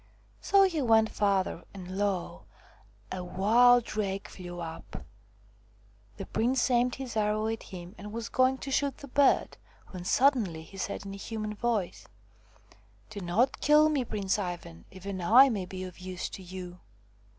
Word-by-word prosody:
So 395 -1 +5
he 345 -6 +1
went 225 -3 +4
farther, 195 -4 0
and 185 -1 -7
lo! 195 -3 -2 0.7
a 185 -1 -4
wild 230 +7 +4
drake 200 -3 -3
flew 175 -1 -8
up. 165 -1 -8 1.1
The - - -6
prince 250 +3 +1
aimed 245 0 +2
his 260 -3 -7
arrow 215 0 +1
at 225 0 -3
him 180 0 -10
and 205 +2 -8
was 230 +1 -4
going 260 +1 +2
to 275 - -5
shoot 280 -1 0
the 280 - -10
bird, 280 +1 +2 0.3
when 185 -2 -7
suddenly 210 - +2
he 195 +4 -14
said 200 +1 -4
in 195 - -6
a - - -7
human 215 +1 -5
voice: 210 -4 -2 0.5
" 105 -1 -29
Do 205 - -6
not 200 +8 0
kill 300 +1 +5
me, 290 -4 +1
Prince 205 -3 -1
Ivan! 175 - -6
Even 190 0 -6
I 245 +10 +7
may 200 -6 -3
be 185 0 -6
of 185 -1 -9
use 185 0 -5
to 195 - -9
you." 180 -1 -8
205 Hz, 165 wpm, -29 LUFS, 185-245 Hz, 1.1 s, I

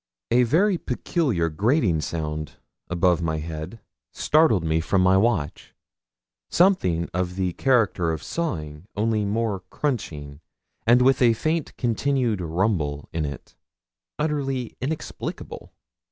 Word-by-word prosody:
A 120 +2 +5
very 175 - +3
peculiar 125 - 0
grating 100 - +1
sound 75 -2 -4 0.4
above 90 -1 +2
my 80 -1 -1
head 80 +7 -6 0.3
startled 150 - +3
me 80 0 +1
from 95 +3 +1
my 95 +1 +5
watch 95 -8 0 0.7
something 95 - +3
of 90 0 -2
the 95 -2 -1
character 105 -10 +2
of 80 - -4
sawing, 80 - -4
only 110 0 +1
more 105 -1 -1
crunching, 75 - -3 0.5
and 120 +2 +6
with 135 +1 +4
a 120 -2 +6
faint 155 +6 -2
continued 120 -3 0
rumble 80 -4 -1
in 80 -2 -1
it 70 -2 -8 0.6
utterly 135 -5 -2
inexplicable. 145 +4 -5
100 Hz, 120 wpm, -24 LUFS, 80-130 Hz, 0.7 s, and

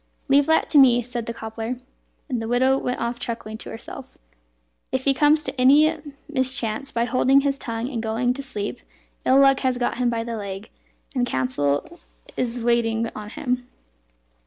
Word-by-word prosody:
"Leave 280 +1 +4
that 320 0 +3
to 295 - +5
me," 245 -3 +6
said 240 -1 -5
the 235 - -3
cobbler. 225 +2 -5 0.5
And 250 -5 -2
the 225 - -4
widow 255 +3 +3
went 250 -2 -2
off 235 +1 -2
chuckling, 220 -2 -5
to - - -6
herself, 225 - -9 0.7
"If 260 0 -1
he 275 - +4
comes 295 +3 +3
to 265 -2 -3
any 300 +5 +6 0.3
mischance 260 -3 0
by 235 0 0
holding 260 +3 +3
his 275 0 -1
tongue 230 -1 -3
and 245 -4 -3
going 230 +3 0
to 275 - -6
sleep, 225 -3 -4 0.5
ill 260 - +5
luck 275 -1 +5
has 255 -2 0
got 245 0 -1
him 245 -1 +2
by 230 -1 -1
the 230 -1 -4
leg, 200 0 -7 0.4
and 250 -3 0
counsel 140 - 0 0.5
is 240 -1 -2
wasted 230 -1 +1
on 210 0 -7
him." 250 +1 -3
245 Hz, 180 wpm, -23 LUFS, 225-265 Hz, 0.7 s, me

